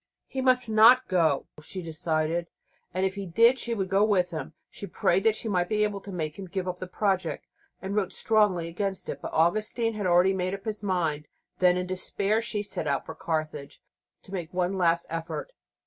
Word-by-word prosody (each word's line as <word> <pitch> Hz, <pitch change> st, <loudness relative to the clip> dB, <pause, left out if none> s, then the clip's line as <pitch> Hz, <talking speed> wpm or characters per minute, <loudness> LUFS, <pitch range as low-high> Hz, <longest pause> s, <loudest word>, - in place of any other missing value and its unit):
He 265 Hz, -, -4 dB
must 255 Hz, -1 st, +3 dB
not 225 Hz, +4 st, +6 dB
go, 160 Hz, -6 st, +2 dB, 0.2 s
she 185 Hz, +4 st, -7 dB
decided, 165 Hz, +1 st, -1 dB, 0.5 s
or 185 Hz, -, 0 dB
if 190 Hz, 0 st, +1 dB
he 200 Hz, -1 st, -6 dB
did 230 Hz, +9 st, +4 dB
she 235 Hz, 0 st, -2 dB
would 195 Hz, -3 st, -1 dB
go 195 Hz, +2 st, +3 dB
with 190 Hz, -4 st, +2 dB
him. 155 Hz, -2 st, -5 dB, 0.2 s
She 200 Hz, -, -8 dB
prayed 185 Hz, +1 st, +1 dB
that 220 Hz, -1 st, +4 dB
she 225 Hz, -, -5 dB
might 180 Hz, -4 st, 0 dB
be 210 Hz, -1 st, +2 dB
able 205 Hz, -2 st, -1 dB
to 200 Hz, -, -9 dB
make 160 Hz, -2 st, -4 dB
him 190 Hz, -, -6 dB
give 185 Hz, 0 st, -3 dB
up 180 Hz, 0 st, -4 dB
the 185 Hz, -, -5 dB
project, 190 Hz, -2 st, -1 dB, 0.4 s
and 195 Hz, +1 st, -3 dB
wrote 195 Hz, -3 st, 0 dB
strongly 205 Hz, -7 st, +2 dB
against 190 Hz, +3 st, -3 dB
it; -, -, -5 dB
but -, -, -5 dB
Augustine 215 Hz, +7 st, +1 dB
had 205 Hz, -3 st, -2 dB
already 180 Hz, +2 st, +4 dB
made 185 Hz, 0 st, -1 dB
up 195 Hz, -, -12 dB
his 215 Hz, -2 st, -4 dB
mind. 165 Hz, -7 st, -1 dB, 0.3 s
Then, 180 Hz, -1 st, +4 dB
in 180 Hz, -, -1 dB
despair, 195 Hz, +3 st, 0 dB
she 215 Hz, -3 st, -3 dB
set 200 Hz, -6 st, -4 dB
out 140 Hz, -1 st, 0 dB
for -, -, -7 dB
Carthage 155 Hz, -3 st, -4 dB, 0.4 s
to 190 Hz, -, -13 dB
make 175 Hz, -3 st, -4 dB
one 180 Hz, +1 st, 0 dB
last 170 Hz, -2 st, +2 dB
effort. 165 Hz, -, -5 dB
185 Hz, 210 wpm, -27 LUFS, 170-210 Hz, 0.5 s, not